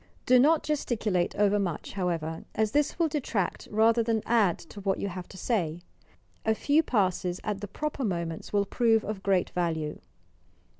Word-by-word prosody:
Do 255 Hz, 0 st, +6 dB
not 305 Hz, +4 st, +4 dB
gesticulate 220 Hz, -, 0 dB
overmuch, 200 Hz, -5 st, 0 dB
however, 165 Hz, -4 st, -2 dB
as 215 Hz, -1 st, +1 dB
this 295 Hz, +2 st, +1 dB
will 335 Hz, -2 st, +3 dB
detract 245 Hz, -, -2 dB
rather 225 Hz, +2 st, +4 dB
than 225 Hz, -1 st, 0 dB
add 220 Hz, -7 st, +3 dB, 0.2 s
to 205 Hz, -, -8 dB
what 195 Hz, -1 st, 0 dB
you 200 Hz, -, -2 dB
have 180 Hz, -1 st, -7 dB
to 190 Hz, -, -12 dB
say, 175 Hz, -7 st, -1 dB, 0.6 s
A 220 Hz, -, +2 dB
few 290 Hz, +7 st, +3 dB
passes 185 Hz, -, 0 dB
at 205 Hz, -2 st, -3 dB
the 205 Hz, -, -4 dB
proper 295 Hz, +5 st, -4 dB
moments 170 Hz, -6 st, -3 dB
will 200 Hz, -1 st, +2 dB
prove 225 Hz, +1 st, +2 dB
of 210 Hz, -2 st, -4 dB
great 190 Hz, -2 st, +1 dB
value. 160 Hz, -4 st, -2 dB
205 Hz, 165 wpm, -28 LUFS, 180-230 Hz, 0.6 s, Do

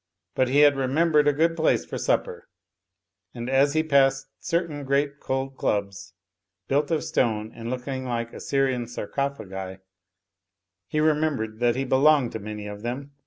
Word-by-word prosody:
But 130 Hz, -, +2 dB
he 140 Hz, +3 st, +4 dB
had 145 Hz, -1 st, +6 dB
remembered 150 Hz, +3 st, +2 dB
a -, -, +6 dB
good 165 Hz, +3 st, +1 dB
place 160 Hz, -1 st, +2 dB
for -, -, -5 dB
supper; 470 Hz, 0 st, -1 dB, 0.9 s
and 120 Hz, 0 st, -5 dB
as 135 Hz, +2 st, +3 dB
he 155 Hz, 0 st, +2 dB
passed 135 Hz, -3 st, +2 dB
certain 165 Hz, -4 st, -2 dB
great 140 Hz, +1 st, 0 dB
cold 135 Hz, 0 st, -3 dB
clubs, 100 Hz, -2 st, -2 dB, 0.5 s
built 145 Hz, +2 st, +1 dB
of 160 Hz, -2 st, 0 dB
stone 110 Hz, -9 st, 0 dB
and 115 Hz, 0 st, -7 dB
looking 130 Hz, +1 st, -4 dB
like 120 Hz, -1 st, -3 dB
Assyrian 130 Hz, -3 st, -1 dB
Sarcophagi, 100 Hz, -6 st, -4 dB, 1.1 s
he 155 Hz, -, -1 dB
remembered 150 Hz, -8 st, 0 dB
that 120 Hz, -1 st, +2 dB
he 135 Hz, +1 st, -1 dB
belonged 135 Hz, -1 st, +4 dB
to 110 Hz, -, -5 dB
many 105 Hz, 0 st, -7 dB
of 105 Hz, 0 st, -7 dB
them. 130 Hz, +5 st, -5 dB
135 Hz, 155 wpm, -25 LUFS, 120-150 Hz, 1.1 s, had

